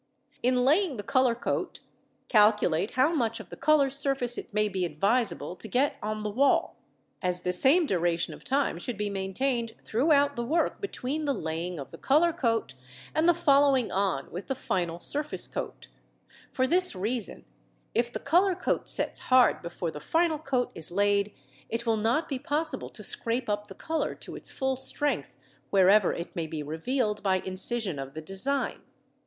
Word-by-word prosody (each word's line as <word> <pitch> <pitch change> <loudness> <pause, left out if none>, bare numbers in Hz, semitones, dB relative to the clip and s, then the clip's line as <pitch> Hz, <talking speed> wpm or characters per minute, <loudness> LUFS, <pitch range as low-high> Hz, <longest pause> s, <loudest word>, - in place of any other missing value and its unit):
In 250 0 +2
laying 310 0 +2
the 205 - -5
colour 255 +1 +2
coat, 240 - -3 0.5
calculate 210 -4 +3
how 280 +6 +4
much 230 -7 0
of - - -11
the - - -6
colour 280 -1 +3
surface 270 -3 +2
it - - -7
may 210 0 +1
be 190 -3 -2
advisable 195 +4 0
to 220 - -7
get 260 +7 +1
on 215 0 -3
the 210 - -2
wall, 270 +6 +2 0.5
as 180 -2 0
the 180 +1 -1
same 280 - +4
duration 175 - 0
of - - -13
time 270 -10 0
should 230 +4 -4
be 205 0 -2
maintained 225 +5 -2
throughout 285 +3 +2
the 240 - -2
work 320 +8 0
between 310 -6 -3
the 280 -2 0
laying 165 +3 -4
of 140 - -8
the - - -11
colour 320 +5 +3
coat 225 - -1 0.4
and 320 +2 +3
the - - +6
following 280 -6 +3
on 190 -8 -1
with 180 +3 -7
the 270 - -2
final 175 -7 -2
surface 295 - -1
coat - - -6 0.6
for 260 - +1
this 360 - +3
reason, 215 +4 -4 0.5
if 235 +1 0
the - - -4
colour 360 +6 +3
coat - - -2
sets - - 0
hard 255 -1 +5
before 170 -1 -4
the 150 - -8
final 325 - +1
coat 265 -4 -1
is 165 +1 -3
laid, 200 +2 +2 0.4
it 230 +1 -3
will 225 -1 +2
not 230 +9 0
be 270 -3 -3
possible 305 +4 -2
to - - -10
scrape 235 +1 -1
up 205 0 -2
the 190 - -11
colour 320 0 -2
to - - -9
its - - -5
full 265 -1 -1
strength 265 +3 -2 0.3
wherever 195 0 +5
it 170 - -6
may 165 -2 -2
be 155 -1 -5
revealed 210 - -2
by 190 -2 +2
incision 190 - +3
of 135 +1 -7
the 155 - -5
design. 195 - -2
235 Hz, 180 wpm, -28 LUFS, 190-275 Hz, 0.6 s, the